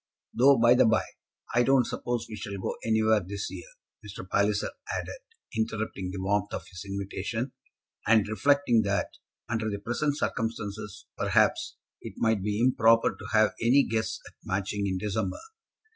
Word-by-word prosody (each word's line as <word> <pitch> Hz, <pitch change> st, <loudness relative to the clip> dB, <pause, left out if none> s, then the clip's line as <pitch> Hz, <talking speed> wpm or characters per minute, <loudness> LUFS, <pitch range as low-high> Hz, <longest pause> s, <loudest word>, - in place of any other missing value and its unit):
Though, 135 Hz, +2 st, +6 dB
by 120 Hz, +1 st, +6 dB
the 125 Hz, -, +5 dB
by, 110 Hz, -, +3 dB, 0.5 s
I 120 Hz, -, +4 dB
don't 130 Hz, 0 st, +4 dB
suppose 120 Hz, -1 st, -3 dB
we 110 Hz, -, -7 dB
shall 100 Hz, -1 st, -6 dB
go 95 Hz, -, -3 dB
anywhere 110 Hz, -1 st, +3 dB
this 100 Hz, +2 st, -5 dB
year," -, -, -8 dB, 0.4 s
Mr. -, -, -9 dB
Palliser -, -, +1 dB, 0.2 s
added, -, -, -4 dB, 0.4 s
interrupting 110 Hz, -4 st, -2 dB
the 95 Hz, +1 st, -5 dB
warmth 100 Hz, +1 st, 0 dB
of -, -, -6 dB
his 90 Hz, -1 st, -9 dB
invitation, 100 Hz, +5 st, -4 dB, 0.6 s
and 110 Hz, -1 st, +5 dB
reflecting 120 Hz, +2 st, +3 dB
that, 100 Hz, 0 st, -1 dB, 0.4 s
under 110 Hz, -1 st, -1 dB
the 100 Hz, -, -3 dB
present 120 Hz, +8 st, -1 dB
circumstances, 105 Hz, -6 st, -3 dB
perhaps, -, -, +2 dB, 0.3 s
it -, -, -8 dB
might 110 Hz, -3 st, +2 dB
be 105 Hz, +1 st, -1 dB
improper 115 Hz, -2 st, +4 dB
to -, -, -10 dB
have 110 Hz, -2 st, +4 dB
any 130 Hz, +5 st, +5 dB
guests 110 Hz, 0 st, -2 dB
at -, -, -14 dB
Matching 100 Hz, 0 st, -2 dB
in 95 Hz, -1 st, -1 dB
December. 100 Hz, 0 st, -2 dB
110 Hz, 160 wpm, -28 LUFS, 100-115 Hz, 0.6 s, Though